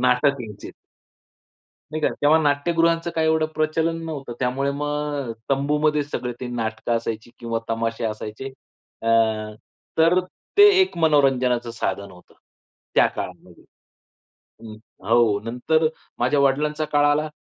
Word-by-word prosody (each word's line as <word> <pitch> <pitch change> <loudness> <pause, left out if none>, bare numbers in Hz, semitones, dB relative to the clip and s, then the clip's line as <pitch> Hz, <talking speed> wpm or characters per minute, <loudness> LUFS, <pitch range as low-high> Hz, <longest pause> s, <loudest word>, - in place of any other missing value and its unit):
नाटक 125 +2 +2
यायचे. 105 -4 -8 1.2
नाही 155 - -2
का. - - +4
तेव्हा 150 +2 +5
नाट्यगृहांचं 165 +3 +1
काय 160 - +1
एवढं 160 0 +2
प्रचलन 160 +2 0
नव्हतं. 145 -6 -6
त्यामुळे 130 +2 0
मग 145 -2 -3
अ, - - -2 0.2
तंबूमध्ये 150 +2 +2
सगळे 125 -4 -4
ते 125 - -4
नाटकं 115 -1 -3
असायची 115 0 -5
किंवा 115 -1 -2
तमाशे 115 0 -2
असायचे. 110 +4 -5 0.5
अ, - - -5 0.9
तर 170 +3 +5 0.4
ते 410 0 +9
एक 375 - +1
मनोरंजनाचं 130 -6 +2
साधन 100 -3 -3
होतं. 90 -1 -18 0.6
त्या - - +6
काळामध्ये - - -8 1.0
हं. 110 -1 -9 0.3
हो 115 -3 +4
नंतर 125 +7 +1 0.3
माझ्या 130 +4 +2
वडिलांचा 150 +3 +1
काळ 145 0 +4
आला 150 +1 +2
140 Hz, 125 wpm, -23 LUFS, 120-155 Hz, 1.2 s, ते